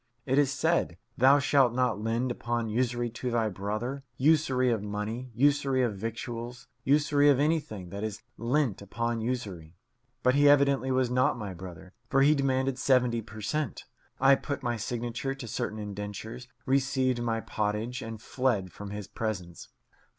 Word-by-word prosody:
It 135 +1 +2
is 140 -2 +3
said, 155 - +1 0.2
"Thou 135 +3 +6
shalt 135 -3 +3
not 125 -4 +1
lend 115 +3 0
upon 120 -1 -2
usury 120 +1 0
to 125 +2 -4
thy 115 -2 +1
brother; 110 +8 -4
usury 130 -3 +3
of 110 -3 0
money, 105 +5 -4
usury 135 0 +3
of 115 -4 0
victuals, 115 +3 -6 0.2
usury 145 0 +4
of 140 -2 +4
anything 145 - -1
that 100 +1 -5
is 110 -1 -4
lent 120 -3 0
upon 115 +3 -2
usury"; 100 -9 -4 0.5
but 125 - +4
he 145 +1 +5
evidently 140 -2 +4
was 130 -1 +1
not 125 0 +2
my 105 -5 -5
brother, 90 +1 -10 0.2
for 135 -2 +4
he 150 +2 +6
demanded 135 -2 0
seventy 125 -4 +3
per 110 0 -10
cent. 150 +4 -2 0.4
I 135 +1 +6
put 140 +1 -2
my 120 -2 0
signature 120 +4 -3
to 130 -3 -8
certain 110 -1 -3
indentures, 105 +4 -6 0.2
received 130 -2 +1
my 115 -1 0
pottage, 110 +3 -2
and 115 -1 -6
fled 110 -7 -1
from 100 -1 -8
his 105 0 -5
presence. 90 -6 -5
120 Hz, 160 wpm, -29 LUFS, 110-135 Hz, 0.5 s, Thou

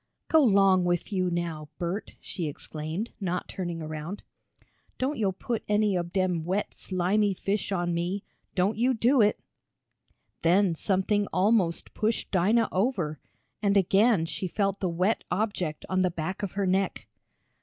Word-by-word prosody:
"Go 320 - +6
'long 195 -6 +5
wif 175 +3 -1
yo' 185 -2 +1
now, 165 -3 -3
Bert!" 175 +5 -4
she 170 -5 -4
exclaimed, 155 +7 -5
not 180 -3 -2
turning 175 -3 -4
around. 155 +5 -6 0.7
"Don't 265 +1 -1
yo' 200 -3 +2
put 225 +5 -3
any 210 -1 +3
ob 175 -1 -2
dem 185 -4 0
wet 190 +5 -1
slimy 190 +2 +1
fish 200 +2 -2
on 175 -2 0
me. 175 +4 -2 0.3
Don't 195 +4 +1
you 255 +2 +3
do 245 +3 +4
it!" 210 0 +3 1.0
Then 180 +2 +4
something 200 +4 +1
almost 185 -3 +1
pushed 220 +1 -1
Dinah 210 +5 +3
over, 185 - 0 0.4
and 200 -1 +3
again 195 0 +4
she 185 +3 -4
felt 195 +1 -1
the 185 - 0
wet 185 +6 +1
object 185 -7 -2
on 185 0 +1
the 185 - +3
back 170 +4 -4
of 200 -3 -3
her 200 0 0
neck. 190 +1 0
190 Hz, 155 wpm, -27 LUFS, 175-205 Hz, 1.0 s, Go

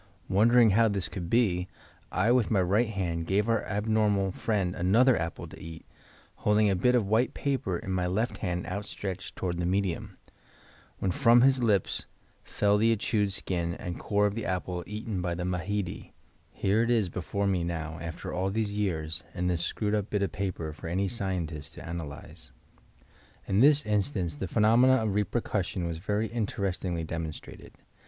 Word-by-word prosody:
Won 100 +4 +4
dering 120 -2 +6
how 115 +3 +4
this 100 -3 -1
could 85 -4 -6
be 95 -6 +2 0.4
I 100 +6 +2
with 125 -3 +3
my 105 - +2
right 100 +6 +2
hand 85 -5 -2
gave 100 +4 +1
our 115 -2 +2
abnorn^ 105 -1 +1
(I) - - -3
friend 95 -3 -1
another 115 +9 +4
apple 85 -3 -3
to - - -12
eat, 80 0 -9 0.5
holding 105 0 +3
a - - +2
bit 125 +8 +3
of 120 -4 +2
white 110 +5 +1
paper 130 -11 -1
in 95 - -6
my 90 -1 0
left 110 +7 -1
hand 90 -3 -2
outstretched 100 -1 -5
toward 90 -2 -3
the 85 - 0
medium, 95 -2 -1 0.8
when 95 - -1
from 120 +1 +5
his 130 0 +4
lips 105 -6 +1 0.4
fell 105 0 +1
the 115 +1 +4
chewed 105 -2 0
skin 85 -3 -1
and 90 -3 -6
core 105 0 +1
of 100 - +1
the 115 +1 -4
apple 90 -1 -2
eaten 105 -2 -4
by 85 -1 -1
the 90 +1 -3
Mahedi; 90 +2 -3 0.4
here 100 +3 +1
it 115 - +1
is 115 -5 +3
before 95 +3 -3
me 95 -3 +1
now 80 -2 -4
after 85 -1 -6
all 95 +2 0
these 105 0 -1
years 85 -5 -2
in 90 0 -2
this 90 -2 +1
screwed 105 +3 -1
up 105 -2 0
bit 105 -1 0
o£ 100 - -1
paper 90 -5 -3
for 80 - -9
any 95 +4 0
scientist 85 -7 -4
to - - -9
analyse," 80 -7 -7 1.0
In 100 +1 +2
this 145 +3 +6
instance 100 - 0
the 95 - -3
phenomena 115 +6 +5
of 110 -5 0
repercussion 105 -3 -1
was 85 -1 -3
very 105 +4 -1
interestingly 100 -6 -2
demonstrated. 80 -1 -7
100 Hz, 180 wpm, -28 LUFS, 90-110 Hz, 1.0 s, dering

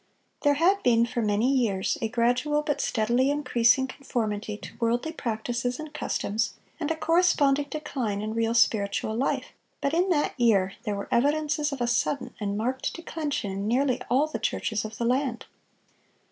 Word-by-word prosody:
There 290 -1 +3
had 375 +6 +3
been 235 -1 +4
for 235 0 -2
many 210 +2 +1
years 215 -8 +1
a 225 - +1
gradual 250 +6 +1
but 290 -1 -1
steadily 240 +4 +1
increasing 260 -3 +3
conformity 220 -6 -3
to - - -11
worldly 240 +6 0
practices 240 -1 -3
and 310 -1 -7
customs, 220 -6 -2 0.2
and 305 -2 -2
a 325 - +1
corresponding 315 -4 +3
decline 260 -9 -3
in 215 0 -3
real 230 0 0
spiritual 215 -2 +2
life; 260 +4 -1 0.3
but 280 - -1
in 360 +3 +2
that 300 -5 +1
year 195 -5 +3
there 210 - -1
were 200 - -5
evidences 295 +3 +1
of 275 -3 -5
a - - +2
sudden 250 +1 0
and 205 -1 -2
marked 255 +4 -2
declension 305 - -3
in 195 +2 -3
nearly 255 +2 +1
all 265 +5 +3
the 310 - -5
churches 220 -2 -1
of 215 0 -7
the 235 - -1
land. 250 0 0
245 Hz, 170 wpm, -27 LUFS, 225-290 Hz, 0.3 s, been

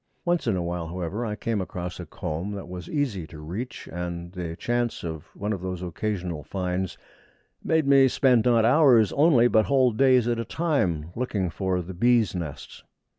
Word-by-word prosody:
Once 175 -6 +1
in 110 - +2
a 90 - -1
while, 85 -1 -3
however, 90 +6 -4
I 105 - -3
came 110 -2 -2
across 90 -1 -5
a 90 - -7
comb 90 0 -4
that 100 - -6
was 90 0 -8
easy 125 - -2
to 80 - -11
reach, 90 +12 -6
and 85 0 -5
the 85 -3 -5
chance 120 +4 -1
of 80 -1 -5
one 105 +1 -2
of 95 - -5
those 90 -1 -4
occasional 90 -2 -3
finds 90 0 -3 0.7
made 160 -2 +2
me 135 -1 +6
spend, 125 -3 +3
not 115 -2 +4
hours 125 -5 +5
only, 140 -6 +5
but 110 -3 +3
whole 130 -3 +3
days 125 +1 +4
at 120 -1 0
a - - -1
time, 95 - -1
looking 105 -7 -1
for 90 +1 -1
the 95 +3 -8
bees' 115 +2 +3
nests. 85 -6 -6
100 Hz, 185 wpm, -25 LUFS, 90-120 Hz, 0.7 s, me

